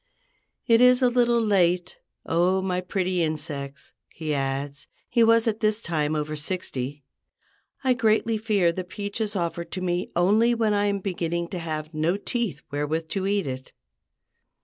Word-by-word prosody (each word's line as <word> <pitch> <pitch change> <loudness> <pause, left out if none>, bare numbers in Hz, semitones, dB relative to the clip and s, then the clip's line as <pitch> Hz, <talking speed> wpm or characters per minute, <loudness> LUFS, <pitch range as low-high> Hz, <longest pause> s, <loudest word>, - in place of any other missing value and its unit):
"It 230 0 +5
is 250 +1 +6
a 245 - +4
little 240 -1 +3
late, 185 -4 +2 0.3
O 180 +3 +2
my 185 -1 -1
pretty 185 0 -1
insects," 145 -3 -4 0.2
he 155 -2 -4
adds—he 140 - -2
was 230 0 +5
at 220 -1 0
this 215 0 +1
time 155 -6 -1
over 155 0 -2
sixty; 145 -4 -3 0.8
"I 260 -1 +4
greatly 225 -2 +2
fear 205 -6 +2
the 185 +2 -4
peach 205 +3 -5
is 215 -1 -2
offered 170 -1 -2
to - - -3
me 180 0 -1
only 215 +7 +4
when 220 -2 +1
I 205 0 +2
am 200 -1 -1
beginning 170 -2 -2
to 180 - -4
have 155 -1 -5
no 160 +5 +1
teeth 210 - -3
wherewith 155 +3 -2
to 195 +1 -2
eat 200 -1 +1
it." 130 -1 -6
180 Hz, 160 wpm, -25 LUFS, 155-215 Hz, 0.8 s, is